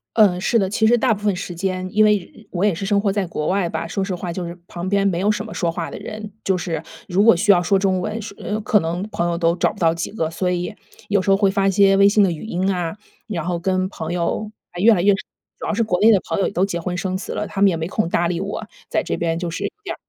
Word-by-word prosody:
呃， 200 -5 +5
是 230 +5 +2
的， 195 -4 +1
其 220 +2 +2
实 240 - +5
大 240 -1 +3
部 210 - -7
分 205 -3 +2
时 180 - -5
间， 185 +1 -2
因 215 - +4
为 210 - +5
人 200 +4 -13
我 180 +1 -1
也 205 -3 +3
是 195 +4 -4
生 200 0 +2
活 200 -1 +1
在 195 -2 -1
国 155 -2 -3
外 190 -2 +1
吧， 160 0 -3
说 175 +4 -3
实 190 -1 -2
话 175 -1 -5
就 180 +1 -4
是 170 +1 -7
旁 175 +1 -6
边 200 0 +2
没 175 -3 +1
有 200 +3 +1
什 215 0 0
么 220 - -8
说 170 - 0
话 165 0 -4
的 - - -7
人， 215 -1 -7
就 190 -1 +2
是 165 -3 -3 0.3
如 185 +2 +2
果 215 -3 +7
需 205 +4 +4
要 175 -3 +5
说 195 +3 +2
中 190 -1 +1
文， 215 +4 -3
说 200 -1 -9 0.2
可 210 0 +3
能 170 +2 -2
朋 175 -4 -1
友 170 - -1
都 170 -1 +2
找 - - +1
不 - - -14
到 165 -2 +3
几 170 +3 -4
个， 165 -7 -2
所 180 +2 -1
以 180 +1 -2 0.4
有 200 -2 +3
时 195 - -2
候 195 - +6
会 195 -1 +3
发 195 -1 +1
一 - - +3
些 195 0 +5
微 200 0 +7
信 205 0 +4
的 185 - +3
语 165 - -6
音 190 -2 0
啊， 175 -1 -3 0.3
然 175 -8 -3
后 175 -1 -2
跟 185 +1 0
朋 160 -3 -5
友 180 +5 -1 0.3
越 225 +2 +7
来 180 - +1
越 200 +2 +5
主 195 - -9
要 - - 0
是 230 - +1
国 180 -5 0
内 220 - +6
的 200 - +4
朋 - - -2
友 195 - +2
也 - - -4
都 185 +1 +2
结 175 -3 -3
婚 180 +1 -3
生 185 +1 -2
子 - - -6
了， 210 - -2
他 195 - -6
们 200 - +7
也 180 - 0
没 160 0 -3
空 215 -2 0
搭 170 0 +1
理 170 - -1
我。 195 +2 -4 0.2
在 - - 0
这 - - -2
边 165 -1 -1
就 175 -1 -3
是 165 - -3
有 - - -1
点 - - -4
190 Hz, 330 characters per minute, -21 LUFS, 175-205 Hz, 0.4 s, 果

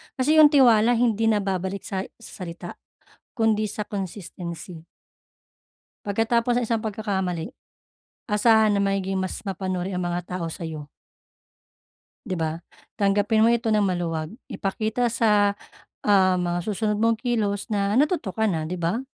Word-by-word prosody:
Kasi 300 +4 +3
'yong 305 - +10
tiwala 240 -4 +5
hindi 225 -2 +2
nababalik 195 -2 -1
sa 190 -1 -3 0.2
salita, 175 -5 -9 0.5
kundi 225 -2 +1
sa 210 +1 -5
consistency. 175 -3 -7 1.2
Pagkatapos 230 +4 +1
ng 245 - -1
isang 225 -2 0
pagkakamali, 190 -6 -3 0.7
asahan 215 0 +4
na 200 - +1
magiging 195 -1 -1
mas 185 - -3
mapanuri 185 -1 -3
ang 180 - -2
mga 175 +1 -3
tao 165 - -2
sa'yo. 160 -4 -6 1.4
'Di 190 - -3
ba? 160 -2 -2 0.4
Tanggapin 205 +2 +3
mo 235 - +4
ito 230 -1 0
nang 210 -2 +3
maluwag. 170 -1 -2 0.2
Ipakita 220 +5 -1
sa, 205 -3 +3 0.5
ah, 190 -3 +4
mga 175 0 -1
susunod 210 +1 -1
mong 230 0 +3
kilos 215 -5 -1
na, 200 +2 +1
natuto 295 - +1
ka 220 +3 -1
na, 165 -6 0
'di 180 - -3
ba? 175 +8 -1
200 Hz, 135 wpm, -24 LUFS, 180-225 Hz, 1.4 s, yong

